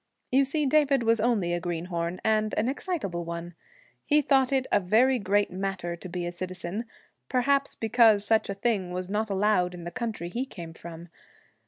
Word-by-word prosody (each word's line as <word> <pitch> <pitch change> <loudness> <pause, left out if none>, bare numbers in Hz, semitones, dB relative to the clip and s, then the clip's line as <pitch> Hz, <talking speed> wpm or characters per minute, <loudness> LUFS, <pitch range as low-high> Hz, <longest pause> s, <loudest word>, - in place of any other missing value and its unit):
You 270 +2 +4
see 300 +2 0
David 275 -2 +3
was 230 0 +3
only 210 -7 +1
a 175 - 0
greenhorn, 170 0 -3
and 215 -1 +1
an 220 - +1
excitable 265 - -3
one. 170 +1 -6 0.5
He 300 0 +3
thought 265 -1 +3
it 265 -1 +1
a - - +4
very 235 +7 +3
great 205 0 +1
matter 185 -2 -3
to 180 +2 -9
be 175 0 -4
a 175 - -3
citizen, 185 +4 -4 0.4
perhaps 275 +2 +1
because 225 -2 +4
such 220 0 +2
a 200 - -2
thing 200 -3 0
was 180 +1 -4
not 215 +2 -1
allowed 190 -3 +1
in 175 - -9
the 175 - -6
country 225 -7 -4
he 240 +8 -2
came 170 -11 -9
from. 170 +1 -10
205 Hz, 185 wpm, -27 LUFS, 175-245 Hz, 0.5 s, You